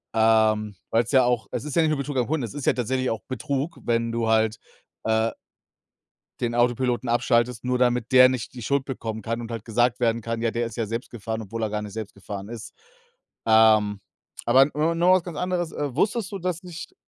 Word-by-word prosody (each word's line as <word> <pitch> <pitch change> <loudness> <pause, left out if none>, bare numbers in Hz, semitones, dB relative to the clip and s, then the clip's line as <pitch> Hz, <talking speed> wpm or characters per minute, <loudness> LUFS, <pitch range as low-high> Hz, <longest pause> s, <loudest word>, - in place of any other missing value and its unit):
ähm, 110 -2 +3
weil's 115 +1 +1
ja 130 -3 +5
auch 120 -2 +1
es - - -3
ist 150 - -5
ja 165 - +4
nicht 155 - +2
nur 150 -2 0
Betrug 140 0 -3
am 125 - +2
Kunden, 155 -1 -1
es 115 - -6
ist 145 - -5
ja - - +4
tatsächlich 130 +1 -1
auch 110 -1 -3
Betrug, 140 +5 -3
wenn 115 -1 0
du 115 -1 -1
halt, 110 0 +2 0.5
äh 110 0 +2 1.1
den 120 -1 -1
Autopiloten 120 +1 +1
abschaltest, 120 0 +1
nur 125 0 0
damit 125 -1 +1
der 130 0 +8
nicht 130 -1 -4
die 120 - -8
Schuld 140 +3 0
bekommen 115 -5 -5
kann 115 +3 -3
und 115 - -7
halt 115 -2 -5
gesagt 120 +2 +1
werden 115 -1 +2
kann: 115 +1 -3
„Ja, 115 - +1
der 120 +1 -1
ist 115 - -8
ja 115 - -1
selbst 115 +3 -5
gefahren“, 110 -1 -5
obwohl 115 +2 -6
er 110 - 0
gar 105 0 -2
nicht 105 -2 -7
selbst 110 -2 -6
gefahren 100 0 -7
ist. 115 -2 -8 0.7
Ähm, 110 -2 +5 0.5
aber 135 +1 +6
no 155 +3 0
noch 170 +2 +2
mal 185 - +8
was 185 -2 +2
ganz 175 -4 -7
anderes, 180 -2 -1
äh, 145 -4 -3
wusstest 205 +2 0
du 195 - -3
das 180 -1 -3
nicht 180 - -9
120 Hz, 225 wpm, -24 LUFS, 110-135 Hz, 1.1 s, der